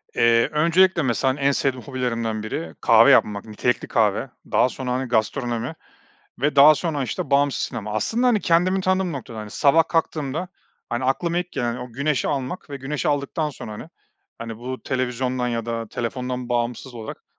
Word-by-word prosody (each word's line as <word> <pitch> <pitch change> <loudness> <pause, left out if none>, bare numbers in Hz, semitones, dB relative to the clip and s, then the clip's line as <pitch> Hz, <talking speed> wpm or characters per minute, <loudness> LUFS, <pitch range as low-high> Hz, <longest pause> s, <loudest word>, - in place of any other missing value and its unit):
Eee, 115 0 +4
öncelikle, 170 +4 +3
mesela, 130 0 +1
hani, 140 - -9
en 140 0 +3
sevdiğim 130 -2 -1
hobilerimden 115 -5 -2
biri 80 -7 -5
kahve - - +6
yapmak, 100 -1 +3
nitelikli 110 +3 -1
kahve, 110 +3 +1 0.2
daha 125 - +4
sonra, 130 -1 -5
hani, 130 +1 -1
gastronomi 120 +3 -1 0.7
ve 145 +1 +1
daha 150 +2 +9
sonra, 155 -3 -2
işte, 125 - -4
bağımsız 140 0 +2
sinema. 110 -3 -4
Aslında, 225 - 0
hani, 235 -4 +3
kendimi 185 +2 +2
tanıdığım 185 -2 +1
noktada 120 -5 -7
hani. 105 -1 -7
Sabah 155 +6 +3
kalktığımda, 160 +1 -1 0.4
hani, 120 +2 -2
aklıma 170 +6 0
ilk 180 0 -4
gelen 120 0 -1
o 125 -1 -8
güneşi 140 +1 0
almak 140 +4 -3
ve 140 - -4
güneşi 140 +2 -3
aldıktan 145 +2 -1
sonra, 110 -5 -8
hani, 105 - -9 0.5
hani, 115 -1 -7
bu 130 +2 -6
televizyondan 125 -1 -1
ya 115 -1 -3
da 115 -1 -3
telefondan 125 +1 -4
bağımsız 120 +1 -2
olarak 110 -2 -8
130 Hz, 175 wpm, -23 LUFS, 115-150 Hz, 0.7 s, daha